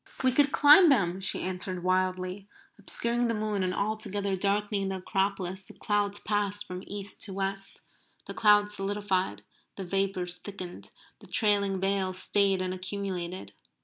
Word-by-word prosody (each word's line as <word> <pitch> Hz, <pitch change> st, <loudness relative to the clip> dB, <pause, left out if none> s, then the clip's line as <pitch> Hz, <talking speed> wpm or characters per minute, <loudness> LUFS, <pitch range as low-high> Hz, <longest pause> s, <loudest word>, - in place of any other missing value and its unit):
"We 260 Hz, -, +4 dB
could 285 Hz, +2 st, +3 dB
climb 300 Hz, +4 st, +8 dB
them!" 190 Hz, -9 st, +2 dB
she -, -, 0 dB
answered 185 Hz, -1 st, -2 dB
wildly. 185 Hz, +1 st, -1 dB, 0.3 s
Obscuring 240 Hz, +1 st, 0 dB
the 230 Hz, -, 0 dB
moon 210 Hz, -2 st, -1 dB
and 185 Hz, -, 0 dB
altogether 200 Hz, -1 st, -2 dB
darkening 200 Hz, +1 st, 0 dB
the 190 Hz, -, -2 dB
Acropolis 190 Hz, -1 st, -2 dB
the -, -, -14 dB
clouds 205 Hz, -1 st, -1 dB
passed 205 Hz, -1 st, -1 dB
from 180 Hz, +1 st, -7 dB
east 200 Hz, -1 st, -6 dB
to 195 Hz, -, -8 dB
west. 195 Hz, 0 st, -4 dB, 0.4 s
The -, -, -6 dB
clouds 210 Hz, -1 st, +4 dB
solidified; 195 Hz, -, -1 dB, 0.3 s
the 195 Hz, -, -6 dB
vapours 185 Hz, -1 st, -1 dB
thickened; 185 Hz, -2 st, -9 dB, 0.3 s
the -, -, -15 dB
trailing 200 Hz, -3 st, +1 dB
veils 190 Hz, -1 st, 0 dB
stayed 195 Hz, 0 st, +1 dB
and 185 Hz, 0 st, -2 dB
accumulated. 185 Hz, -, -5 dB
195 Hz, 145 wpm, -28 LUFS, 185-205 Hz, 0.4 s, climb